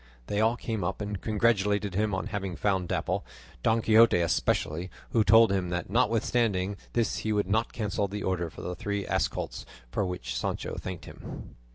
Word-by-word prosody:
They 105 Hz, +8 st, 0 dB
all 115 Hz, +2 st, +3 dB
came 110 Hz, -6 st, -3 dB
up 90 Hz, +2 st, -2 dB
and 105 Hz, -2 st, -4 dB
congratulated 105 Hz, -2 st, +1 dB
him 105 Hz, +3 st, +1 dB
on 95 Hz, -, -2 dB
having 95 Hz, -3 st, -3 dB
found 95 Hz, -2 st, 0 dB
Dapple, -, -, -1 dB, 0.4 s
Don 110 Hz, -, +2 dB
Quixote 115 Hz, -2 st, +6 dB
especially, 85 Hz, +1 st, 0 dB, 0.2 s
who 115 Hz, -, +4 dB
told 110 Hz, +1 st, +7 dB
him 95 Hz, -2 st, 0 dB
that 90 Hz, +1 st, -3 dB
notwithstanding 115 Hz, -4 st, +1 dB, 0.2 s
this 115 Hz, -2 st, +1 dB
he 110 Hz, -, -2 dB
would 105 Hz, -1 st, +2 dB
not 110 Hz, +4 st, +1 dB
cancel 105 Hz, -2 st, -1 dB
the 100 Hz, +1 st, -5 dB
order 85 Hz, -3 st, -1 dB
for -, -, -10 dB
the 90 Hz, -, -3 dB
three 100 Hz, +3 st, -3 dB
ass -, -, +1 dB
colts, -, -, -5 dB, 0.3 s
for 105 Hz, -, 0 dB
which 90 Hz, -1 st, -4 dB
Sancho -, -, -2 dB
thanked 95 Hz, -2 st, -6 dB
him. -, -, -9 dB
100 Hz, 185 wpm, -28 LUFS, 95-110 Hz, 0.4 s, told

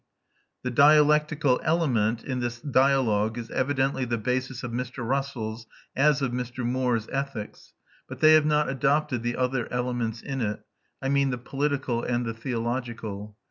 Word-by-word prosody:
The 125 Hz, -, -2 dB
dialectical 150 Hz, 0 st, +4 dB
element 120 Hz, -9 st, +1 dB
in 130 Hz, -2 st, -3 dB
this 120 Hz, -1 st, -3 dB
dialogue 125 Hz, -5 st, +2 dB
is 115 Hz, -1 st, -6 dB
evidently 135 Hz, 0 st, 0 dB
the 120 Hz, -1 st, -1 dB
basis 125 Hz, +3 st, -2 dB
of 120 Hz, -, -4 dB
Mr. 125 Hz, 0 st, -4 dB
Russell's, 120 Hz, -4 st, -3 dB, 0.3 s
as 145 Hz, 0 st, +3 dB
of 130 Hz, -, 0 dB
Mr. 125 Hz, 0 st, -4 dB
Moore's, 125 Hz, -2 st, 0 dB
ethics; 135 Hz, -6 st, -5 dB, 0.3 s
but -, -, -8 dB
they 155 Hz, 0 st, +7 dB
have 155 Hz, -1 st, +5 dB
not 150 Hz, 0 st, +2 dB
adopted 135 Hz, -1 st, +1 dB
the 120 Hz, +1 st, -2 dB
other 125 Hz, -2 st, -1 dB
elements 120 Hz, -2 st, -2 dB
in 135 Hz, -1 st, -3 dB
it, 105 Hz, -2 st, -2 dB, 0.4 s
I 135 Hz, -, 0 dB
mean 140 Hz, 0 st, +2 dB
the 125 Hz, -, -2 dB
political 135 Hz, -1 st, -1 dB
and 120 Hz, 0 st, -1 dB
the 115 Hz, -, -3 dB
theological. 115 Hz, -3 st, -4 dB
125 Hz, 155 wpm, -26 LUFS, 120-140 Hz, 0.4 s, they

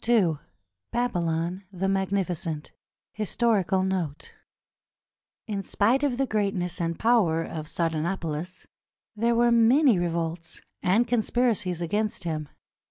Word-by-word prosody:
II 185 Hz, -11 st, +3 dB, 0.5 s
BABYLON 175 Hz, -5 st, -1 dB
THE 190 Hz, 0 st, -2 dB
MAGNIFICENT 190 Hz, -5 st, -1 dB, 0.4 s
HISTORICAL 210 Hz, -3 st, +1 dB
NOTE 180 Hz, -6 st, -3 dB, 1.1 s
In 205 Hz, -4 st, -3 dB
spite 225 Hz, +7 st, +2 dB
of 275 Hz, -4 st, 0 dB
the 270 Hz, -, +2 dB
greatness 195 Hz, -6 st, -1 dB
and 170 Hz, 0 st, -1 dB
power 205 Hz, -9 st, +3 dB
of 155 Hz, -2 st, -6 dB
Sardanapalus, 165 Hz, +1 st, -2 dB, 0.5 s
there 230 Hz, +2 st, +2 dB
were 240 Hz, 0 st, +4 dB
many 235 Hz, -, +5 dB
revolts 170 Hz, -1 st, -3 dB, 0.2 s
and 220 Hz, +7 st, +3 dB
conspiracies 225 Hz, -6 st, +1 dB
against 210 Hz, +5 st, -1 dB
him. 155 Hz, -3 st, -3 dB
190 Hz, 105 wpm, -26 LUFS, 170-225 Hz, 1.1 s, many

